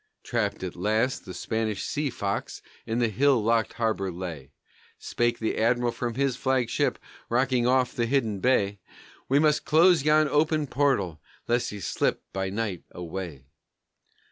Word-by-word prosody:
Trapped 110 -6 -2
at 90 - -5
last 110 +8 0
the 95 - -7
Spanish 110 -3 -2
sea 145 -1 -1
fox 100 -5 -4 0.2
in 115 0 -1
the 120 -1 +2
hill 130 +4 +3
locked 115 0 +1
harbor 110 -5 -1
lay; 85 -6 -7 0.5
Spake 120 0 -1
the 110 - -2
Admiral 120 +1 +2
from 120 -1 -4
his 135 -1 +1
flagship, 130 -2 0 0.3
rocking 125 0 +2
off 125 -1 +2
the 120 -1 0
hidden 115 -6 0
bay, 100 -4 +2 0.5
"We 135 - +4
must 150 0 +3
close 170 +1 +5
yon 155 +1 +4
open 155 +1 +2
portal 125 - 0 0.3
lest 120 +1 +1
he 105 - -7
slip 95 - -1
by 95 0 -2
night 100 -3 -3
away!" 85 -5 -7
115 Hz, 150 wpm, -26 LUFS, 100-130 Hz, 0.5 s, close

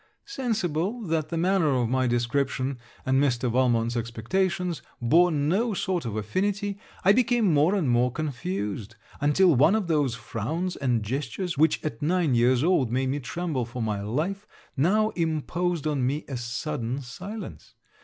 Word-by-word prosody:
Sensible, 225 - -2
that 160 -5 -1
the 165 - -2
manner 180 -1 +2
of 125 -2 +1
my 130 +1 +1
description, 130 +2 0 0.3
and 130 +1 +3
Mr. 125 -3 +1
Valmont's 120 -1 +2
expectations, 170 - -1 0.2
bore 165 +9 +4
no 180 +9 +1
sort 180 -5 -1
of 110 -3 -3
affinity, 200 - -1 0.3
I 195 - +8
became 235 -5 +3
more 155 +7 +4
and 180 -8 0
more 125 +1 +3
confused; 110 -7 -4 0.2
until 160 +5 +4
one 150 - +5
of 220 -3 0
those 145 -7 +1
frowns 160 - -3
and 120 -5 0
gestures, 140 - -3
which 155 +2 +2
at 140 -7 -4
nine 165 -2 +2
years 120 +2 +3
old 150 -9 +2
made 130 +1 0
me 140 +2 -1
tremble 150 0 -3
for 120 +2 -7
my 105 -2 -2
life, 165 - -2 0.3
now 205 +10 +3
imposed 165 -1 -1
on 145 -4 0
me 140 +5 -1
a 135 - -5
sudden 125 +1 -3
silence. 185 - -8
145 Hz, 155 wpm, -26 LUFS, 125-180 Hz, 0.3 s, I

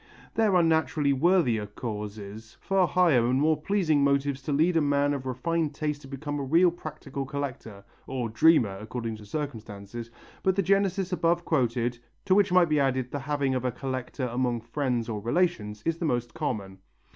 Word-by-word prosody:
There 215 -4 +2
are 175 - +5
naturally 160 -3 +2
worthier 135 - +2
causes, 105 0 -7
far 195 -2 +2
higher 170 -11 +4
and 130 +2 +2
more 155 +1 +2
pleasing 160 -6 +2
motives 140 0 +1
to 140 - -4
lead 160 +5 +2
a 165 - +4
man 145 0 +2
of 135 -2 -4
refined 150 +4 -1
taste 150 -1 -2
to 135 - -12
become 145 +2 -4
a - - -2
real 170 +6 +4
practical 150 -4 -6
collector 130 -7 -6 0.2
or 130 -3 -2
dreamer 110 -4 +3
according 115 0 -5
to 105 -1 -13
circumstances 115 -5 -6 0.3
but 190 -1 +2
the 195 - +1
genesis 195 -1 +1
above 170 0 +1
quoted, 120 -4 0 0.3
to 185 - +3
which 200 -1 +4
might 180 -1 +5
be 150 -1 +2
added 130 -2 0
the 145 - -3
having 140 -1 -1
of 130 -1 -1
a 125 - 0
collector 130 +1 -4
among 120 -1 -1
friends 120 -1 -2
or 110 -3 -3
relations, 110 - -1
is 165 0 0
the 175 - -1
most 120 -5 -1
common. 100 -12 -4
140 Hz, 180 wpm, -27 LUFS, 120-165 Hz, 0.3 s, are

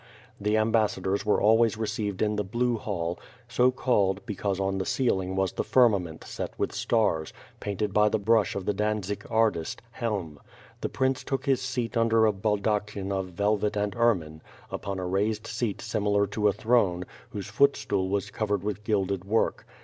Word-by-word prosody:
The 105 +2 +1
ambassadors 105 -3 +1
were 105 - +3
always 115 +1 +4
re 110 - -1
ceived 105 -2 -2
in 105 0 +1
the 105 - 0
Elue 120 +4 0
Hall, 90 -5 -3 0.3
so 125 +1 +3
called, 100 -7 +1
because 100 -2 -2
on 95 0 0
the 95 - -2
ceiling 95 -8 0
was 95 -1 +1
the - - -2
firmament 100 -10 +2
set - - -6
with - - -1
stars, 85 -9 0 0.3
painted 100 0 -2
by 105 0 +4
the 110 - +1
brush 110 0 +2
of 100 -2 -4
the 105 - +1
Dantzig 105 0 -2
artist. 110 -8 +1
Helm. 100 - -3 0.4
The - - -2
prince 130 0 0
took 135 0 -3
his 135 -3 +2
seat 125 -2 -3
under 115 -1 +4
a 110 - +3
baldachin 105 -1 -1
of 95 -1 -1
velvet 105 +2 +1
and 105 -1 -1
ermine, 90 -10 +1 0.3
upon 100 -1 -4
a 95 - -3
raised 105 +4 0
seat 115 -2 -2
similar 100 -1 +1
to 105 +1 0
a - - +5
throne, 100 -5 +1 0.2
whose 100 - -5
footstool 100 -5 +1
was 100 +1 -1
covered 105 -3 -1
with 105 0 -3
gilded 100 -3 0
work. 110 +3 0
105 Hz, 175 wpm, -27 LUFS, 95-110 Hz, 0.4 s, a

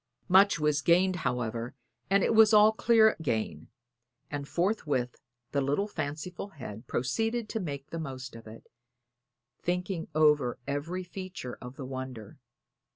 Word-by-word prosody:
Much 195 +1 +6
was 150 0 +2
gained, 180 +4 +3
however, 120 -3 -2 0.3
and 195 0 +4
it - - +2
was 220 0 +7
all 210 +1 +7
clear 220 0 +4
gain; 110 - -2 0.6
and 145 -1 -4
forthwith 150 - -1 0.3
the 140 - +1
little 145 +9 0
fanciful 155 +1 -5
head 125 - -9
proceeded 225 - -1
to 220 - -3
make 145 -5 -6
the 165 - -4
most 130 -4 -6
of 115 -1 -11
it, 110 +1 -12 1.0
thinking 180 -1 -2
over 150 -5 +3
every 155 +6 -3
feature 180 -8 -7
of 125 +1 -9
the 135 - -7
wonder. 130 -5 -7
150 Hz, 140 wpm, -29 LUFS, 130-190 Hz, 1.0 s, was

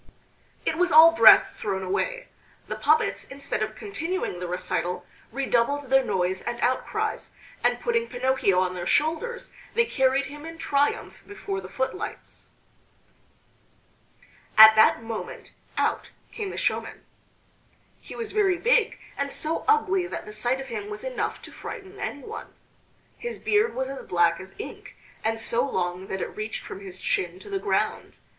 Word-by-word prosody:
It 320 - 0
was 360 -1 +3
all 320 +2 +9
breath 230 -9 +8
thrown 195 -2 -3
away. - - -2 0.4
The - - -3
puppets, - - +2
instead 275 -4 -4
of 215 0 -2
continuing 365 - -3
the 180 - -4
recital, 180 0 -2 0.3
redoubled 275 +1 0
their 270 0 +5
noise 185 -5 -1
and 240 0 -4
outcries, 255 +1 -1 0.3
and - - +2
putting 470 -1 0
Pinocchio 245 -7 +1
on 185 -1 0
their 175 -1 -5
shoulders 325 - 0 0.2
they 470 0 +4
carried 265 - +2
him 295 +2 -9
in 330 +1 -8
triumph 290 -3 0
before 400 -1 -5
the - - -10
footlights. 265 +10 -5 2.1
At 220 0 +11
that 220 +1 +5
moment 225 -1 -7 0.2
out - - 0 0.2
came 420 -4 -4
the - - -7
showman. - - -2 0.9
He - - -11
was 455 -2 -5
very 390 -4 +2
big 475 +2 +2 0.2
and 280 0 -1
so 315 +1 -2
ugly 390 -4 +3
that - - -6
the 210 - -8
sight 240 +5 0
of 270 - -6
him 405 - -5
was 420 +2 -6
enough - - -3
to - - -10
frighten 390 0 -9
anyone. 285 -2 -6 0.6
His 475 0 -5
beard 425 +2 +1
was 260 0 -1
as 275 0 -6
black 170 -1 +2
as 190 0 -11
ink, 435 - -9 0.3
and 225 +1 0
so 235 +2 +1
long 185 -7 -2
that 190 -1 -4
it - - -5
reached 215 +1 -5
from - - -7
his 190 -2 -9
chin 180 -1 -1
to - - -11
the 390 - -1
ground. - - -1
270 Hz, 160 wpm, -26 LUFS, -, 2.1 s, At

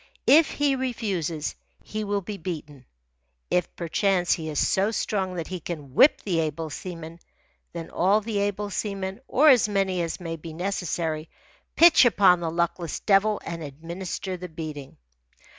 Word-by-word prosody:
If 310 +1 +6
he 285 -2 +1
refuses, 195 - -2 0.3
he 215 0 -4
will 205 -1 -1
be 205 +2 -6
beaten. 150 -6 -7 0.7
If, 180 -1 0
perchance, 180 +1 +1
he 160 -2 -4
is 150 - -4
so 195 +8 +2
strong 195 -4 -2
that 170 -2 -3
he 185 -1 -4
can 150 -5 -7
whip 280 - +5
the 180 -5 0
able 155 0 -2
seaman, 165 +1 -7 0.5
then 170 -1 -7
all 195 +4 +3
the 215 -1 -3
able 205 0 -2
seamen, 195 0 -3
or 300 +4 +5
as 245 -6 +5
many 195 -3 0
as 165 -1 -3
may 165 -2 -5
be 160 0 -9
necessary, 165 -3 -2 0.5
pitch 340 -3 +7
upon 195 -6 +5
the 170 -1 -2
luckless 170 0 -2
devil 205 +1 +3
and 170 0 -5
administer 170 +5 -5
the 180 0 -8
beating. 155 -4 -7
180 Hz, 160 wpm, -25 LUFS, 165-205 Hz, 0.7 s, pitch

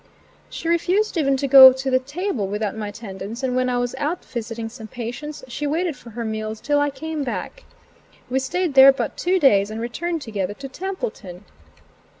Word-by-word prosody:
She 330 - -6
refused 360 +6 +1
even 275 -5 +2
to 275 - -1
go 265 -1 +11
to 265 +1 -3
the 255 - +4
table 285 - -3
without 210 +1 -3
my 215 -1 -4
attendance, 205 +2 -8
and 255 -1 0
when 255 0 +1
I 245 - 0
was 245 0 -1
out 310 +5 -2
visiting 230 -1 -5
some 225 -1 -10
patients, 245 +7 -7
she 290 +4 -4
waited 325 +1 -1
for 240 - -14
her 230 +1 -5
meals 220 0 -4
till 290 +3 +1
I 290 0 +2
came 305 +2 -5
back. 390 - -5 0.6
We 260 +1 0
stayed 335 +4 -2
there 270 0 +9
but 270 - -4
two 365 +2 +1
days 205 - +4
and 220 +1 -6
returned 320 +8 -3
together 205 -4 -3
to 275 +3 -8
Templeton. 365 - -6
260 Hz, 190 wpm, -22 LUFS, 225-305 Hz, 0.6 s, go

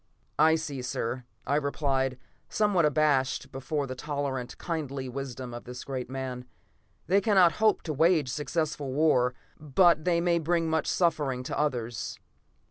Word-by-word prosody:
"I 160 +1 +6
see, 150 -5 -4
sir," 125 0 -3 0.2
I 140 - +1
replied, 135 -3 0 0.3
somewhat 205 -6 +2
abashed 145 -3 +1
before 140 +2 -2
the 130 - -5
tolerant, 140 -2 -4
kindly 140 -6 -4
wisdom 130 -1 -6
of 120 - -8
this 125 0 -7
great 130 -3 -5
man. 130 -1 -5 0.6
"They 195 +3 +3
cannot 190 -6 +5
hope 215 -1 +3
to 155 - -3
wage 160 -2 +3
successful 150 0 -2
war, 130 -4 +3 0.2
but 155 +2 +4
they 170 -1 +2
may 170 0 +2
bring 165 +1 +1
much 160 0 0
suffering 145 -7 +1
to - - -4
others." 120 -6 -2
145 Hz, 145 wpm, -28 LUFS, 130-160 Hz, 0.6 s, I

